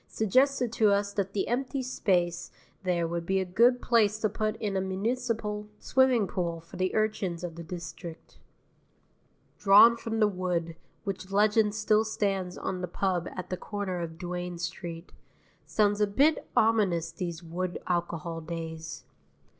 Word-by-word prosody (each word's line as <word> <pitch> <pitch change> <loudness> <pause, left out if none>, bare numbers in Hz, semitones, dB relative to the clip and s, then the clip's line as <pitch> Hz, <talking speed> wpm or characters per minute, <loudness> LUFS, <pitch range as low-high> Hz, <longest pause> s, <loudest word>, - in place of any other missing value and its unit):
suggested 255 +3 +2
to 220 -2 +4
us 200 0 +1
that 195 -1 -2
the 200 - -1
empty 265 +2 -1
space 175 -8 0 0.3
there 175 -3 0
would 170 0 -3
be 190 +3 +1
a 190 - -1
good 235 +7 +4
place 215 -3 +3
to 215 - +1
put 215 +1 -2
in 210 -3 -3
a 190 - +1
municipal 210 +1 -2
swimming 260 -4 +3
pool 170 -3 -2
for 165 +1 -14
the 185 0 0
urchins 205 -5 0
of 175 -2 -4
the 170 - -8
district. 170 0 -8 1.2
Drawn 210 +4 +8
from 225 -1 -3
the 215 - +5
wood, 180 -4 -2 0.3
which 195 -1 -5
legend 210 +1 +3
still 215 0 +3
stands 195 -4 -1
on 185 -1 -3
the 180 - -2
pub 180 -1 -1
at 185 -1 -6
the 185 - -1
corner 195 -2 -4
of 160 -1 -6
Duane 180 0 -4
Street, 170 0 -6 0.6
sounds 205 -1 +2
a 210 - +4
bit 280 +10 +2
ominous 195 -7 +3
these 170 0 -5
wood 175 +2 -3
alcohol 170 -2 -2
days. 160 0 -6
190 Hz, 155 wpm, -29 LUFS, 175-215 Hz, 1.2 s, Drawn